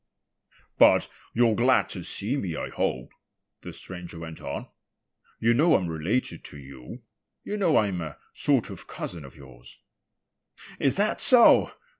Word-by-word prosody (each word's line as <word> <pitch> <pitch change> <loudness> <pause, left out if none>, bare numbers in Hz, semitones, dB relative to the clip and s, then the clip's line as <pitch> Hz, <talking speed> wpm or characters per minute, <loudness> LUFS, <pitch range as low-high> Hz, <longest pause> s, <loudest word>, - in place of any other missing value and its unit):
"But - - +6 0.2
you're 115 -1 +3
glad 125 +4 +3
to 90 - -5
see 105 +8 -2
me, 95 - -3
I - - -4
hope," 65 -1 -3 0.5
the - - -8
stranger 90 -2 -9
went 80 -1 -9
on. - - -5 0.7
"You 115 +1 +3
know 155 +7 +4
I'm 90 - 0
related 85 +11 -2
to 75 - -8
you. 65 -3 -11 0.4
You 210 - -4
know 185 -7 +2
I'm 100 -5 0
a 80 -3 -7 0.2
sort - - +1
of - - -11
cousin 85 -4 -6
of 70 -2 -13
yours." 65 -3 -14 1.0
"Is 135 - +1
that 210 +2 0
so?" 250 -3 +6
95 Hz, 150 wpm, -26 LUFS, 80-130 Hz, 1.0 s, But